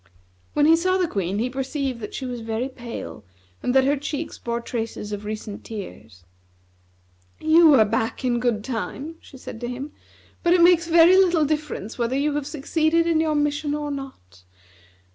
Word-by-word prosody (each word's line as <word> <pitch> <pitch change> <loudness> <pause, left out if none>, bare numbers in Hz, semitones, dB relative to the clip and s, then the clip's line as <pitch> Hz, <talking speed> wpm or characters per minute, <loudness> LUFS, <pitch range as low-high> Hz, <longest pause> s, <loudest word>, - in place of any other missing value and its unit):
When 295 - +3
he 320 +2 +7
saw 370 +3 +1
the 365 -2 +1
Queen, 195 - -2
he 230 +4 0
perceived 265 0 -3
that 210 - -7
she 265 - -4
was 245 -2 -5
very 225 +3 -3
pale 235 - -8 0.4
and 250 - -1
that 265 - +6
her 280 +2 +2
cheeks 295 +2 -5
bore 235 0 -3
traces 225 -3 -5
of 205 0 -5
recent 215 -1 -6
tears. 110 - -9 1.2
"You 315 -1 +6
are 220 -4 +6
back 225 +4 -2
in 240 -1 +1
good 235 -4 0
time," 270 +6 -5
she 270 - -14
said 235 -2 -9
to 240 - -3
him, 260 +4 -6 0.5
"but 345 - +3
it 345 - +5
makes 345 -1 +5
very 340 +2 +7
little 350 -5 +4
difference 295 -7 -3
whether 240 +2 0
you 290 +1 +1
have 290 -1 -2
succeeded 315 +2 +1
in 335 -2 +2
your 310 -1 0
mission 295 0 0
or 295 -1 -3
not. 260 - -9
270 Hz, 180 wpm, -23 LUFS, 230-310 Hz, 1.2 s, he